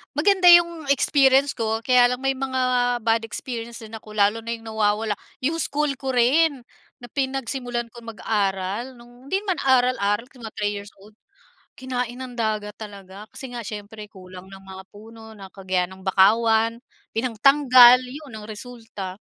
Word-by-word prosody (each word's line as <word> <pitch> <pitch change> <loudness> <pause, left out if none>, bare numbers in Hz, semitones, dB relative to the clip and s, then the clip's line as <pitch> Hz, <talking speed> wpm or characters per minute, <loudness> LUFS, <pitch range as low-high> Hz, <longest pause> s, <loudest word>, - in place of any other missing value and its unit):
maganda 370 +4 +3
yung 340 -2 +5
experience 275 0 +3
ko. 225 -1 -1
Kaya 250 -1 +4
lang 250 - -6
may 270 0 +1
mga 260 -1 -3 0.4
bad 225 0 +1
experience 230 +1 -6
din 220 +1 -10
ako, 215 -1 -12
lalo 210 +2 +2
na 230 - -5
yung 225 0 -13
nawawala 215 0 0 0.3
'yong 310 +5 0
school 300 +1 -1
ko 265 0 -4
rin 275 +4 +3 0.4
na 245 - -11
pinagsimulan 265 -3 -3
kong 230 -1 -10
mag-aral 200 +4 -2
nong 245 +2 -17
hindi 385 - +2
man 375 - +1
aral-aral, 245 -4 +2
mga 235 -5 -10
3 205 0 -1
years 200 +1 -9
old, 210 +2 -18 0.6
kinain 250 -2 -4
ng 255 -2 -8
dagat 215 -2 -2
talaga 200 -1 -11
kasi 265 - -8
nga 235 - -5
siyempre 210 0 -8
kulang 185 -1 -13
ng 195 0 -12
mga 190 0 -11
puno 220 +1 -13
ng 195 -2 -12
kagaya 185 -2 -1
ng 190 0 -13
bakawan, 220 +4 +3 0.4
pinangtanggal, 250 +1 +6
'yon 270 +2 -10
ang 210 - -10
resulta. 215 -4 -8
230 Hz, 160 wpm, -23 LUFS, 210-260 Hz, 0.6 s, pinangtanggal